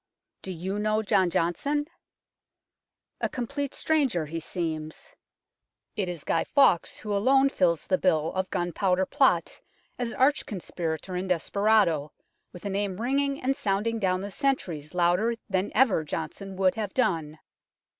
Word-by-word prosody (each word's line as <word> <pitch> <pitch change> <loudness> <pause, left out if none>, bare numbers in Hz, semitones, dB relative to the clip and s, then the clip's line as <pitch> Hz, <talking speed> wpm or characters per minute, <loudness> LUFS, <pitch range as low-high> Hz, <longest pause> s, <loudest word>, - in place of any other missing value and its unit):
Do 190 - -6
you 185 +4 -3
know 215 +1 +1
John 195 -4 +3
Johnson? 280 - 0 1.3
A - - -1
complete 275 +3 -4
stranger 275 - +1
he 165 +2 -4
seems. 160 -2 -5 0.8
It 195 -4 -1
is 170 -4 -5
Guy 165 - +1
Fawkes 275 - +3
who 210 -1 -4
alone 270 +6 +4
fills 170 - +1
the 185 - +1
bill 160 -4 +1
of 190 0 -2
Gunpowder 180 +2 0
Plot - - +2 0.4
as 240 -1 -2
arch 285 +3 +2
conspirator 175 -3 -4
and 185 +1 -3
desperado, 180 -4 +2 0.4
with 180 0 -12
a - - -1
name 195 -1 -2
ringing 275 +3 0
and 270 +1 +1
sounding 215 +2 -1
down 185 -2 +1
the 200 +1 -5
centuries 185 - -2
louder 180 +7 +2
than 190 -1 -1
ever 220 -9 +4
Johnson 195 +5 -5
would 185 -1 +3
have 210 -3 -4
done. 165 -11 0
195 Hz, 145 wpm, -27 LUFS, 175-230 Hz, 1.3 s, alone